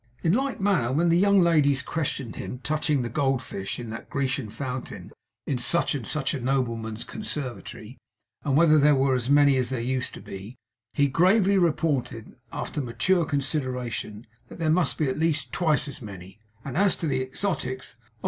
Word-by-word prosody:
In 165 - +3
like 270 +3 0
manner 190 -12 +2
when 165 +5 +2
the 165 - +4
young 200 +1 +5
ladies 145 -6 +3
questioned 140 -6 -3
him - - -5
touching 150 -3 0
the - - -2
Gold 135 0 0
Fish 95 -3 -5
in 120 -2 -6
that 115 - -8
Grecian 135 -4 -1
fountain 125 -6 -6 0.3
in 135 -4 -1
such 135 +9 +1
and 130 -7 -4
such 150 -3 -1
a 140 - -3
nobleman's 115 -4 -1
conservatory, 130 -5 -6 0.4
and 140 -1 +1
whether 155 -1 +6
there 145 0 +5
were 135 0 +2
as 125 0 -1
many 145 -1 +5
as 125 -1 0
there 130 -2 -2
used 130 +2 -2
to - - -9
be, 100 +5 -9 0.4
he 145 -1 +4
gravely 190 +7 +4
reported, 145 -9 0 0.2
after 150 - -4
mature 140 +9 +1
consideration, 125 -7 -3 0.2
that - - -11
there 160 -2 +1
must 175 +1 +2
be 155 - +1
at 130 - -2
least 160 -2 0
twice 155 -4 +1
as 145 0 -8
many; 95 -2 -10 0.3
and 135 -3 -5
as 200 -1 +4
to - - -4
the 135 -4 0
exotics, 130 -3 -3
'Oh! 110 - -32
135 Hz, 185 wpm, -26 LUFS, 125-160 Hz, 0.4 s, whether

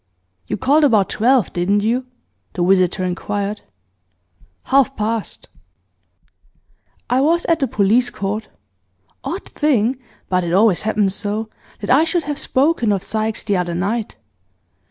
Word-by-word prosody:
'You - - -2
called 285 +4 +3
about 220 -9 +3
twelve, 245 0 +2
didn't 200 +4 +1
you?' 245 +4 0 0.5
the 175 - -1
visitor 185 0 +2
inquired. 200 +3 -3 1.0
'Half 270 0 +2
past.' 220 0 -3 1.6
'I 255 +1 +3
was 335 +4 +2
at 330 -1 +2
the 270 - +1
police 225 +5 +2
court. 210 +2 -4 0.8
Odd 375 +4 -5
thing 260 -4 0 0.3
but 185 -1 0
it 170 0 -2
always 200 -1 +4
happens 210 -3 +1
so 215 +2 -1 0.3
that 205 - -2
I 280 +5 +5
should 330 +1 0
have 295 -1 -4
spoken 270 -5 +1
of 195 -2 -1
Sykes 220 +1 -2
the 205 -3 0
other 175 -1 -2
night. 205 +5 -2
220 Hz, 135 wpm, -19 LUFS, 195-265 Hz, 1.6 s, I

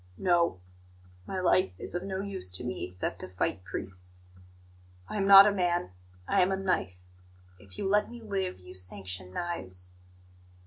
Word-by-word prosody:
"No. 170 - +2 0.7
My 190 - -3
life 185 - +3
is - - -3
of 175 - -2
no 190 0 -3
use 195 - -4
to 90 - -1
me 125 -6 -3
except 90 0 -4
to - - -4
fight 90 0 -2
priests. 90 -1 -8 0.8
I - - -4
am 195 -1 +1
not 195 0 +11
a 210 - +4
man; 175 - 0 0.4
I - - +3
am 180 +1 +3
a 190 - 0
knife. 95 - -1 0.6
If 95 -1 -13
you - - -2
let 210 +2 +2
me 240 - -9
live, 195 - -3
you 90 0 -12
sanction 90 0 -4
knives." 95 - -4
170 Hz, 170 wpm, -29 LUFS, -, 0.8 s, not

